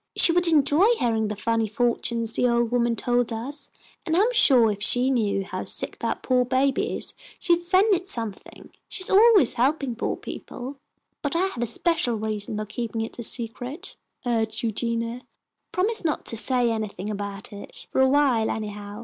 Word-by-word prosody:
"She -, -, +6 dB
would 350 Hz, +1 st, +3 dB
enjoy 310 Hz, +4 st, +4 dB
hearing 225 Hz, -, 0 dB
the 210 Hz, -, -4 dB
funny 225 Hz, +2 st, 0 dB
fortunes 230 Hz, 0 st, 0 dB
the 250 Hz, -, +2 dB
old 235 Hz, -1 st, +1 dB
woman 240 Hz, -1 st, +1 dB
told 245 Hz, +1 st, 0 dB
us, 270 Hz, +6 st, -4 dB, 0.3 s
and 325 Hz, -1 st, 0 dB
I'm 445 Hz, +6 st, +3 dB
suah 255 Hz, -, +5 dB
if 205 Hz, -1 st, -4 dB
she 245 Hz, +6 st, +3 dB
knew 205 Hz, -6 st, 0 dB
how 205 Hz, -, -5 dB
sick -, -, -1 dB
that -, -, -3 dB
poah 255 Hz, -1 st, +2 dB
baby 260 Hz, +2 st, 0 dB
is -, -, -5 dB, 0.2 s
she'd 345 Hz, -1 st, +2 dB
send 375 Hz, +4 st, +3 dB
it 370 Hz, +1 st, -2 dB
something. 225 Hz, -, -4 dB, 0.2 s
She 375 Hz, -, +1 dB
is -, -, -2 dB
always 410 Hz, -, +6 dB
helpin' 275 Hz, -2 st, +1 dB
poah 230 Hz, -, -2 dB
people." 265 Hz, +3 st, -8 dB, 0.4 s
"But 285 Hz, +1 st, -2 dB
I 355 Hz, +3 st, +2 dB
have 385 Hz, -11 st, -4 dB
a 240 Hz, -, 0 dB
special 245 Hz, 0 st, 0 dB
reason 215 Hz, -1 st, -3 dB
for 215 Hz, -, -3 dB
keeping 225 Hz, +1 st, -4 dB
it 225 Hz, +2 st, -6 dB
a -, -, -2 dB
secret," 245 Hz, -, -4 dB, 0.3 s
urged 225 Hz, -2 st, -1 dB
Eugenia. 230 Hz, +1 st, -2 dB, 0.5 s
"Promise 430 Hz, +5 st, +1 dB
not 315 Hz, -2 st, -1 dB
to -, -, +2 dB
say 245 Hz, +1 st, +2 dB
anything 215 Hz, -2 st, -4 dB
about 200 Hz, 0 st, -6 dB
it 205 Hz, -, -9 dB
for -, -, +2 dB
awhile 265 Hz, -4 st, +3 dB
anyhow. 210 Hz, -1 st, -5 dB
240 Hz, 180 wpm, -24 LUFS, 220-290 Hz, 0.5 s, She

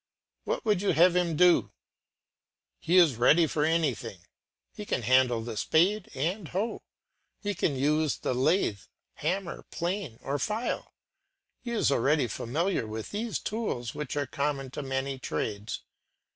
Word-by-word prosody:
What -, -, -2 dB
would 210 Hz, -4 st, +2 dB
you 200 Hz, -, +2 dB
have 175 Hz, +3 st, +5 dB
him 175 Hz, -3 st, +1 dB
do? 180 Hz, 0 st, +5 dB, 1.1 s
He 175 Hz, +3 st, +2 dB
is 160 Hz, -10 st, +6 dB
ready 155 Hz, +8 st, +5 dB
for 150 Hz, -1 st, -1 dB
anything. 145 Hz, -, 0 dB, 0.5 s
He 210 Hz, -, -7 dB
can 130 Hz, -, -2 dB
handle 125 Hz, -1 st, +3 dB
the 115 Hz, -1 st, -5 dB
spade 180 Hz, -, +2 dB
and 170 Hz, +7 st, -2 dB
hoe, 200 Hz, +8 st, -2 dB, 0.6 s
he 205 Hz, -1 st, -2 dB
can 150 Hz, -7 st, 0 dB
use 150 Hz, +3 st, +1 dB
the -, -, -2 dB
lathe, 130 Hz, -, +2 dB, 0.4 s
hammer, 175 Hz, +3 st, -2 dB
plane, 175 Hz, -, -3 dB
or 140 Hz, +1 st, -2 dB
file; 215 Hz, +3 st, -3 dB, 0.6 s
he 245 Hz, -, -7 dB
is 230 Hz, -11 st, +1 dB
already 140 Hz, +2 st, +2 dB
familiar 135 Hz, -, -1 dB
with 110 Hz, 0 st, -6 dB
these 220 Hz, +1 st, -2 dB
tools 200 Hz, -, -3 dB
which 150 Hz, -2 st, -5 dB
are 145 Hz, -, 0 dB
common 140 Hz, -1 st, -2 dB
to 150 Hz, -, -5 dB
many 135 Hz, 0 st, -3 dB
trades. 105 Hz, -3 st, -4 dB
150 Hz, 145 wpm, -28 LUFS, 130-180 Hz, 1.1 s, is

